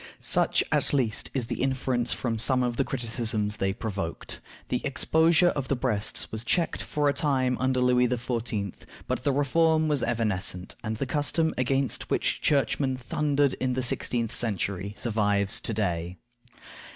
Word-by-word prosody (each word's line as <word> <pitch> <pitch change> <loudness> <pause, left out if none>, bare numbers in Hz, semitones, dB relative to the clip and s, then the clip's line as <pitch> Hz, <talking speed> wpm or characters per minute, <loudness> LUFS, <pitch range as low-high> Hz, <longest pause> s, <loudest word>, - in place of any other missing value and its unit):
Such, - - +2
at - - +2
least, 125 -6 0
is 130 -3 0
the - - -4
inference 130 -2 0
from 115 -3 -2
some 125 +2 +3
of 120 -1 -1
the - - +1
criticisms 115 -4 -1
they 95 0 0
provoked. 100 -5 -5 0.3
The 125 - -1
exposure 160 +5 +3
of 140 -5 -3
the 140 - +1
breasts 120 -5 -1
was 110 0 -3
checked 165 +7 0
for 150 -1 -1
a 140 - +3
time 130 -4 +1
under 130 0 +1
Louis 125 0 +4
XIV., 115 -5 -2 0.3
but - - -3
the 140 - +2
reform 155 +3 +2
was 145 -4 +1
evanescent, 105 -6 0
and 110 -1 -3
the 135 - -2
custom 155 +3 +1
against 135 +1 0
which - - 0
churchmen 135 -1 +1
thundered 140 +2 0
in 130 -1 0
the 130 0 -1
sixteenth 115 -1 0
century 100 -3 -2
survives 105 -2 +1
to - - -3
day. 90 -4 -2
125 Hz, 160 wpm, -27 LUFS, 110-135 Hz, 0.3 s, Louis